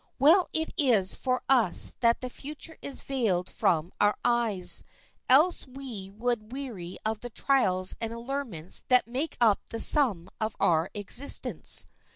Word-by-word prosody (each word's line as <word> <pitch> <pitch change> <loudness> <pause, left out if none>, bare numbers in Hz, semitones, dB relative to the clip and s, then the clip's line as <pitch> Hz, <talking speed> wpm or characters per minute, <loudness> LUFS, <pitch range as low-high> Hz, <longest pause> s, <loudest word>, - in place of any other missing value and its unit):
Well 330 +7 +4
it 320 0 -2
is 230 - +3
for 255 -1 -2
us 245 -9 +4
that 235 -1 +2
the 255 - -5
future 300 +4 -8
is 280 - -5
veiled 215 -10 -1
from 165 +1 -1
our 205 0 +2
eyes, 220 -7 +1 0.5
else 300 +5 +4
we 250 -7 -7
would 220 +1 -3
weary 230 -10 -6
of 220 0 -2
the 245 - -8
trials 195 -8 +1
and 225 -1 -3
allurements 235 - -3
that 250 -1 +3
make 265 +7 -4
up 220 -4 +3
the 230 - -5
sum 225 - +3
of 215 0 -3
our 165 +1 +2
existence. 205 +7 +1
235 Hz, 150 wpm, -27 LUFS, 195-270 Hz, 0.5 s, Well